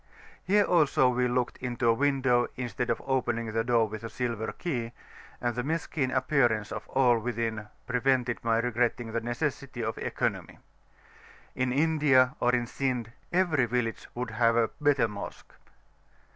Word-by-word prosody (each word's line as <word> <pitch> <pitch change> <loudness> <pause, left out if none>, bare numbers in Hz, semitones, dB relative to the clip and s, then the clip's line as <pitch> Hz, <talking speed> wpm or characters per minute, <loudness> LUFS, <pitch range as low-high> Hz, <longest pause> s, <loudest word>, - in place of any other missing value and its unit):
Here 205 +2 +4
also 150 -8 +3
we 125 0 +1
looked 125 0 -1
into 120 -1 -2
a 115 - +6
window 130 -2 +2
instead 125 0 -3
of - - 0
opening 120 -4 -1
the 115 +1 0
door 115 -2 +2
with 110 +1 -7
a 115 - -5
silver 115 -3 -3
key, 120 -9 -4 0.5
and 120 -1 -1
the 125 - -1
mesquin 150 -1 -1
appearance 125 -5 +1
of - - -6
all 125 -3 +3
within 115 -2 -3 0.2
prevented 125 -1 0
my 115 -1 +2
regretting 120 0 0
the 115 +1 -1
necessity 130 +1 -3
of 110 0 -3
economy. - - -2 1.0
In 130 -1 -1
India 145 -3 +3
or 120 - +3
in 120 -1 0
Sind 125 -2 -2 0.2
every 175 -7 +2
village 115 -1 -2
would 125 -1 -3
have 115 +1 +2
a 115 -1 +2
better 145 -5 +3
Mosque. 105 -2 -8
125 Hz, 155 wpm, -28 LUFS, 115-130 Hz, 1.0 s, a